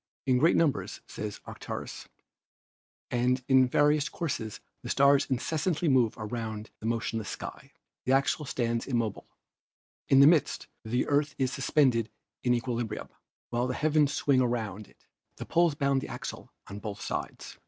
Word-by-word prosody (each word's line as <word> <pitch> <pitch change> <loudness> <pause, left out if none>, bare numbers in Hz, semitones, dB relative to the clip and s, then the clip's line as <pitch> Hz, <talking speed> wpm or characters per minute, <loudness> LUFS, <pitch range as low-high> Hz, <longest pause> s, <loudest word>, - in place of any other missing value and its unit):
" - - -41
Tn 125 -1 +4
great 165 +5 +4
numbers/ 155 -5 +1
says 105 -1 -6
Aratus, - - -7 1.0
'and 125 +1 +1
in 130 -1 +5
various 150 +2 +3
courses 120 - -4 0.2
the - - -7
stars 140 0 +4
incessantly 160 +6 0
move 125 -6 +3
around 110 -1 -5
the 110 - -4
motionless 115 -2 -2
skies. - - -7 0.4
The 130 - +2
axle 140 +3 +2
stands 115 -3 -1
immovable. 115 -5 -2 0.8
In 135 - +6
the 140 - +9
midst 155 0 +3 0.2
the 120 +3 0
Earth 145 0 +1
is 130 -1 0
suspended 125 -6 +2 0.3
in 125 -1 +2
equilibrium, 120 -2 -3 0.4
while 120 +1 0
the 125 - -2
heavens 150 0 +2
swing 140 -2 +2
around 110 -4 -2
it. - - -26 0.3
The - - -7
poles 170 -2 +2
bound 140 -2 +1
the - - -6
axle - - -7
on 100 +1 -8
both 105 -2 -6
sides. - - -5
130 Hz, 155 wpm, -29 LUFS, 115-145 Hz, 1.0 s, the